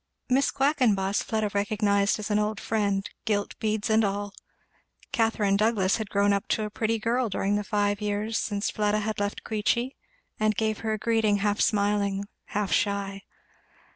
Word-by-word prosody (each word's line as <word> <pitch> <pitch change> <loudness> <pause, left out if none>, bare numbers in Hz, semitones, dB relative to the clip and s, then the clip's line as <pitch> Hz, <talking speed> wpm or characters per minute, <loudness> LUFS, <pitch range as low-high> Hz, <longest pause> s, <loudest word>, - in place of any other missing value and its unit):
Miss 270 +2 +3
Quackenboss 240 -9 +2
Fleda 215 -2 -1
recognised 200 0 +1
as 210 0 -4
an 210 - +3
old 210 0 -1
friend, 200 -3 0 0.2
gilt 205 -3 -1
beads 215 -1 -1
and 220 0 +3
all. 205 0 -2 0.8
Catherine 225 -3 +2
Douglass 205 -2 +2
had 220 -3 -5
grown 200 0 +3
up 200 - -1
to 220 - 0
a 210 - -4
pretty 225 +1 0
girl 235 +2 0
during 195 +1 0
the 210 - 0
five 205 0 0
years 210 +2 -1
since 205 -1 -1
Fleda 210 0 +1
had 215 0 -3
left 205 0 -2
Queechy, 235 +4 0 0.4
and 215 0 +2
gave 220 0 0
her 220 -1 -1
a - - -1
greeting 220 -1 +2
half 205 +1 0
smiling, 200 -1 +1 0.2
half 205 -1 -2
shy. 200 -1 0
210 Hz, 170 wpm, -27 LUFS, 200-220 Hz, 0.8 s, Miss